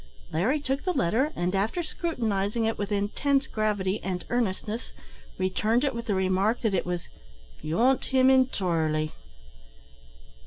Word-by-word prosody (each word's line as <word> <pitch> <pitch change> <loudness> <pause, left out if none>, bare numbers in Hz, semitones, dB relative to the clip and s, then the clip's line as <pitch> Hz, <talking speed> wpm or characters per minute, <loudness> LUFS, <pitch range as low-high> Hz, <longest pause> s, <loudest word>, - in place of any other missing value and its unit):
Larry 225 - +2
took 275 0 -2
the 365 - 0
letter, 255 - +1
and, 175 +1 -1
after 215 - 0
scrutinising 225 - -1
it 225 - 0
with 205 0 -4
intense 270 +8 +1
gravity 210 -2 -1
and 185 -2 -3
earnestness, 225 -1 -1 0.5
returned 215 +6 +1
it, 275 -2 +1
with 235 0 -5
the 205 - +1
remark, 190 +4 +1
that 220 -4 +1
it 180 - 0
was 175 -1 -3 0.5
"beyant 240 +12 +2
him 260 0 +4
entirely." 165 -12 +1
215 Hz, 140 wpm, -27 LUFS, 190-260 Hz, 0.5 s, him